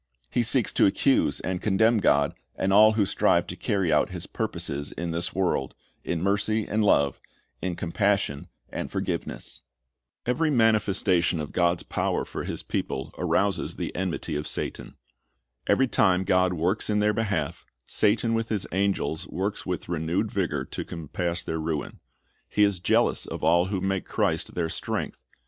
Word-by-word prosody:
He 120 - +2
seeks 120 0 0
to - - +5
accuse 95 - +2
and 90 -1 -3
condemn 110 +3 +3
God, 70 -7 +3 0.2
and 95 +1 0
all 110 +2 +7
who 105 -2 +2
strive - - +2
to - - -7
carry 95 -6 0
out 75 - +3
His - - -6
purposes 70 +1 -4
in 85 0 -4
this 85 +1 -3
world, 90 -8 0 0.3
in 85 0 -2
mercy 105 +2 +1
and 110 +1 +1
love, 70 -9 +3 0.4
in 90 -2 -2
compassion 95 -4 0 0.2
and - - -4
forgiveness. - - -4 0.6
P'very 155 +6 +1
manifestation 100 - +3
of 75 - -5
God's 85 -1 +1
power - - -1
for - - -5
His - - -3
people 65 - -3
arouses - - +1
the - - -4
enmity 90 -4 -2
of 75 +1 -3
Satan. - - -4 0.7
Every 135 - +4
time 95 -6 +3
God 90 0 +3
works 90 +7 0
in 105 - +2
their 105 0 +3
behalf, 105 -2 -2 0.2
Satan 115 +2 +2
with 115 0 -1
his 105 -3 0
angels 95 -3 0
works 100 +3 -3
with 90 -1 -3
renewed 85 +6 -1
vigor 80 - -1
to - - -5
compass 85 +2 -3
their 80 - -3
ruin. 80 -1 -3 0.5
He 105 - +3
is 100 -3 +2
jealous 85 - +2
of - - -6
all 85 +2 +4
who 95 0 -2
make 95 0 -1
Christ - - -1
their 85 -2 0
strength. - - -3
95 Hz, 165 wpm, -26 LUFS, 85-105 Hz, 0.7 s, all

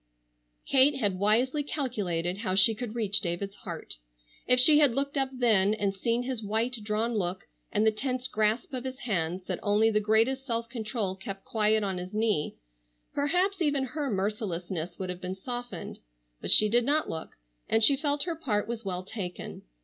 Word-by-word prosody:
Kate 275 +2 +5
had 205 -8 -1
wisely 240 +8 +3
calculated 200 - -2
how 190 -4 -1
she 195 +3 +7
could 230 0 -6
reach 210 -3 +1
David's 195 +2 -4
heart. 170 - -7 0.5
If 250 0 +5
she 295 +4 +8
had 280 -6 +4
looked 280 +1 -1
up 270 -1 +1
then 220 -6 +3
and 200 -2 -1
seen 230 +5 -1
his 250 -2 -3
white, 225 +4 -1
drawn 215 +3 -1
look, 185 -4 -2 0.3
and 215 - +1
the 220 - +5
tense 255 +3 -3
grasp 220 +5 -1
of 255 -1 -3
his 260 0 -6
hands 180 -5 -2
that - - -4
only 215 +2 +2
the 210 - +2
greatest 225 +5 +1
self 230 -3 -3
control 220 -4 -3
kept 195 0 -8
quiet 215 -1 +1
on 190 -2 -2
his 180 +3 -8
knee, 215 -9 0 0.6
perhaps 360 +7 0
even 290 -4 +1
her 285 +2 -3
mercilessness 190 -5 -3
would 185 -1 -4
have 180 0 -9
been 185 +1 -4
softened. 245 +4 -6 0.4
But - - -4
she 215 - +7
did 240 +3 +3
not 295 +5 +2
look, 160 - -7 0.3
and 225 0 +2
she 280 +5 +7
felt 290 0 0
her 340 -2 -3
part 215 -10 -1
was 235 -1 -5
well 185 -2 -4
taken. 185 -3 -7
220 Hz, 185 wpm, -28 LUFS, 195-255 Hz, 0.6 s, she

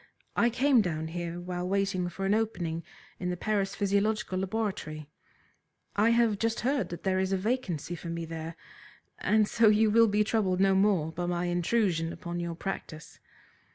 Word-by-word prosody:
I 235 - +4
came 260 +1 +4
down 160 -4 -2
here 175 0 -4
while 180 0 -4
waiting 195 -2 0
for 195 +2 -5
an 195 - +2
opening 175 -7 -1 0.4
in 180 - -2
the 180 - -2
Paris 200 0 -1
Physiological 200 -1 0
Laboratory. 190 -7 -3 0.8
I 215 +3 +4
have 230 -3 +3
just 225 0 0
heard 270 +2 0
that 170 - -7
there 190 -1 +1
is 190 0 0
a 195 - +2
vacancy 185 - -2
for 170 0 -7
me 170 0 -3
there, 165 0 -6 0.6
and 215 0 +3
so 230 +1 +4
you 215 0 +4
will 230 +1 +6
be 210 0 +2
troubled 205 -4 0
no 195 0 +4
more 190 -5 +2
by 175 +2 -3
my 175 0 -1
intrusion 175 -1 +1
upon 175 0 -5
your 170 -1 -3
practice. 165 -4 -6
190 Hz, 175 wpm, -29 LUFS, 175-215 Hz, 0.8 s, will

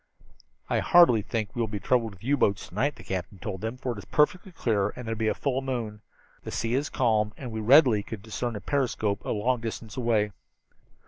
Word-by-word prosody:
"I - - +1
hardly 170 -11 +6
think 110 0 -3
we - - -6
will 115 - +1
be 105 -1 -4
troubled 115 -2 +1
with 95 - -19
U 140 +4 +2
boats 100 -7 0
to - - -19
night," 140 +2 0
the - - -13
captain 95 +1 -4
told 95 0 -5
them, 110 +3 -4
"for 130 -1 -3
it 110 - -6
is 95 - -10
perfectly 180 +5 +1
clear 105 - 0
and 125 - -7
there 115 - -1
will 110 - -6
be 110 - +1
a - - +1
full 135 -2 -1
moon. 115 -5 -4 0.4
The - - -6
sea 115 +1 -2
is 140 +3 0
calm 110 -4 +1
and 125 -4 -7
we 110 - -4
readily 120 -1 +6
could 100 0 -8
discern 115 +1 -3
a 105 - -5
periscope 115 -7 -1
a - - -5
long 120 +3 0
distance 115 -1 -6
away." 115 -4 +1
115 Hz, 235 wpm, -27 LUFS, 105-130 Hz, 0.4 s, hardly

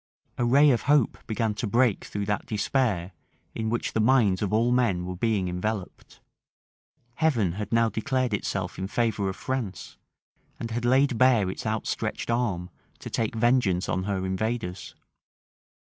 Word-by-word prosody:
A 120 - +2
ray 140 +4 +6
of 120 - +1
hope 145 -5 +3
began 110 -1 -1
to 110 +2 -3
break 120 0 +2
through 105 0 -4
that 105 0 -2
despair 105 -4 0 0.4
in 110 -1 -2
which 120 +1 -2
the - - 0
minds 110 -5 +3
of 105 - -1
all 115 +3 +2
men 115 -8 +1
were 90 0 -5
before 100 -1 0
enveloped. 90 +2 -5 1.0
Heaven 125 - +2
had 105 +3 -5
now 115 0 +4
declared 125 +2 -1
itself 100 -1 -3
in 95 - -2
favor 110 -2 0
of 95 - -5
France, 120 -8 -5 0.6
and 115 - -5
had 120 +1 -2
laid 130 -1 +3
bare 120 -7 +4
its 100 - -6
outstretched 110 +1 -2
arm 100 -7 -1 0.3
to - - -9
take 115 0 -1
vengeance 115 -6 +2
on 95 +2 -1
her 95 -2 -2
invaders. 95 0 -3
110 Hz, 160 wpm, -26 LUFS, 95-120 Hz, 1.0 s, ray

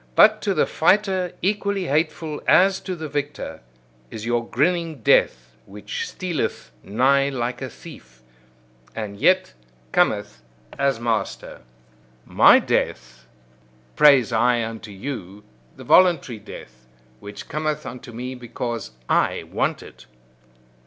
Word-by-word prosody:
But 215 0 +6
to 200 -2 -1
the - - +3
fighter 190 +1 +1
equally 200 -1 0
hateful 155 0 -1
as 190 +1 +5
to 185 -1 -5
the 160 -2 -6
victor, 145 0 -5 0.5
is 110 0 -7
your 120 0 -1
grinning 165 +3 0
death - - +2
which 465 -2 -6
stealeth 175 - -4
nigh 135 - +2
like 125 -1 -4
a 130 - -4
thief, 65 - -14 0.7
and 100 -2 -6
yet 185 +6 +3 0.4
cometh - - 0 0.3
as 135 -4 0
master. 115 -2 -3 0.6
My - - +6
death, 60 -1 -2 0.7
praise 140 -6 +5
I 120 +1 +2
unto 110 -1 -8
you, 100 -2 -7 0.3
the - - -11
voluntary 165 -11 +3
death, 65 -9 -13 0.3
which 100 +6 -10
cometh 155 -1 -3
unto 125 -1 -9
me 125 +3 -6
because 120 - -6
I - - +1
want - - -1
it. 65 -1 -15
135 Hz, 120 wpm, -22 LUFS, 115-175 Hz, 0.7 s, But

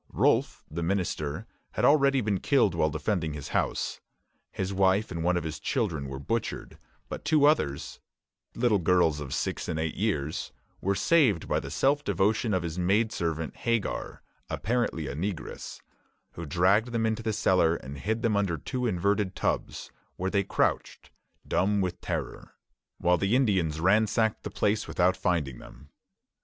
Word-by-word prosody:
Rolfe, - - +2
the 85 +3 -5
minister, 85 -5 -2 0.3
had - - +1
already 140 -2 +4
been 105 -4 0
killed 125 - +3
while 80 -2 +2
defending 80 0 -1
his 75 -2 -7
house. - - -1 0.5
His 95 +1 -3
wife 95 +2 +2
and 85 -2 -3
one 90 +1 +2
of 85 - -2
his 80 -2 -5
children 85 - -1
were 65 0 -6
butchered; 115 +12 -3 0.3
but - - -6
two 150 -2 +4
others 75 - +1 0.6
little 115 -4 +2
girls 85 -3 +3
of 70 -2 -6
six - - -2
and 80 - -2
eight 80 0 -1
years 80 -8 -2 0.3
were 100 +1 +1
saved 125 - +3
by - - +1
the 70 - -7
self 140 - +1
devotion 105 - +1
of 95 -3 +1
his 85 +1 -4
maid 105 +5 +2
servant, 80 -3 -3
Hagar, 115 -3 -2 0.3
apparently 115 -9 -1
a 70 - -4
negress, 90 +3 -5 0.5
who 85 -1 -7
dragged 100 +9 +2
them 115 -1 +1
into 110 0 0
the 110 0 -1
cellar 95 -6 +3
and 70 -1 -8
hid 110 - -2
them 115 -3 +2
under 100 -5 +1
two 125 - -3
inverted 100 0 0
tubs, - - -2 0.2
where 95 +1 -2
they 100 -1 +2
crouched, 100 - -1 0.4
dumb 100 +2 +1
with 90 -2 -2
terror, - - -5 0.4
while 90 0 +2
the 100 +4 +2
Indians 95 - +1
ransacked 110 +4 +2
the - - -5
place 105 +1 0
without 90 +1 +2
finding 75 -10 -1
them. - - -14
95 Hz, 165 wpm, -28 LUFS, 80-110 Hz, 0.6 s, already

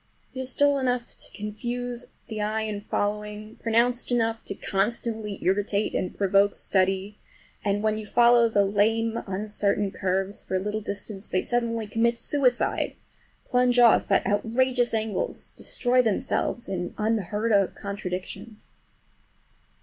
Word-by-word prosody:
It 260 - -6
is 260 -1 -4
dull 285 -1 +3
enough 250 -2 -1
to - - -7
confuse 240 +3 -5 0.2
the 215 -1 -4
eye 215 +1 -1
in 215 -2 -3
following, 210 +1 -3
pronounced 240 +2 +2
enough 225 -2 0
to 200 - -5
constantly 210 +1 -1
irritate, 200 +2 +1
and 180 - -1
provoke 200 +1 +3
study, 195 +2 0 0.4
and 205 0 0
when 215 0 +1
you 215 - -7
follow 235 0 +5
the 205 -2 +3
lame, 225 +3 +1
uncertain 200 0 -1
curves 195 +1 -1
for - - -3
a - - +2
little 210 +3 -3
distance 200 0 -5
they 185 - 0
suddenly 230 -2 0
commit 230 +3 +1
suicide—plunge 250 -1 0
off 240 -2 +5
at - - +3
outrageous 240 +3 +1
angles, 220 - -2
destroy 250 0 +2
themselves 240 +1 -1
in 180 -2 -4
unheard 215 0 0
of 200 -2 +3
contradictions. 200 +2 -6
215 Hz, 135 wpm, -26 LUFS, 200-235 Hz, 0.4 s, follow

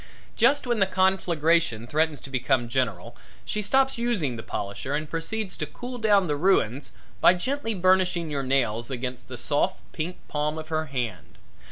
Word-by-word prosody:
Just 270 +5 +3
when 240 -2 0
the 195 - +4
conflagration 170 - +2
threatens 155 +3 0
to 135 - -10
become 130 -1 +1
general 115 -7 -2 0.3
she 210 - -1
stops 265 +4 +2
using 205 - 0
the 115 - -6
polisher 105 +7 -4
and 155 +1 -2
proceeds 185 +5 -3
to 155 - -3
cool 245 - -7
down 205 -3 +4
the 150 -3 0
ruins 145 - +1 0.3
by 180 - +6
gently 225 +3 -2
burnishing 185 -3 +2
your 140 -1 -1
nails 120 -4 0
against 125 -1 -5
the 125 - -7
soft, 145 +8 +1
pink 170 +3 -4
palm 150 +1 -1
of 155 0 -7
her 155 0 -1
hand. 120 -8 -4
155 Hz, 170 wpm, -26 LUFS, 130-190 Hz, 0.3 s, by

